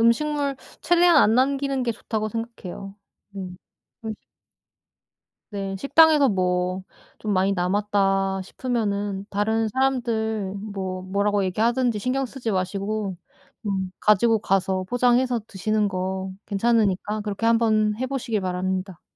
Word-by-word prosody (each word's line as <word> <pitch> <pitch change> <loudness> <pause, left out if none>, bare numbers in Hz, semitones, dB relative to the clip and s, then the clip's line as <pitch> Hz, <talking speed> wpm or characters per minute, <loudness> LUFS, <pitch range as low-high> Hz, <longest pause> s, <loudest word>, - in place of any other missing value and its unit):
음식물 280 +4 +2 0.2
최대한 345 +1 +4
안 220 - +5
남기는 275 0 +1
게 235 - 0
좋다고 215 0 -3
생각해요. 205 -3 -7 0.4
음. 180 -2 -6 0.5
음식 220 -1 -6 1.3
네. 195 -1 -3
식당에서 300 +4 +5
뭐 185 -1 0 0.3
'좀 215 -1 -2
많이 190 +1 +2
남았다.' 195 +1 +1
싶으면은 205 -4 -2
다른 220 +2 +1
사람들 220 -5 0
뭐 190 -3 -5
뭐라고 200 +2 0
얘기하든지 235 +4 +1
신경 260 +4 -1
쓰지 245 -3 -4
마시고 195 +1 -2 0.5
음 190 -2 -1
가지고 220 +2 +4
가서 190 -1 0
포장해서 245 +2 +2
드시는 210 +2 0
거 190 0 -3 0.2
괜찮으니까 210 -1 +1
그렇게 210 +2 -2
한번 215 -2 +3
해 260 - -1
보시길 240 -5 -2
바랍니다. 185 0 -3
210 Hz, 280 characters per minute, -24 LUFS, 190-235 Hz, 1.3 s, 안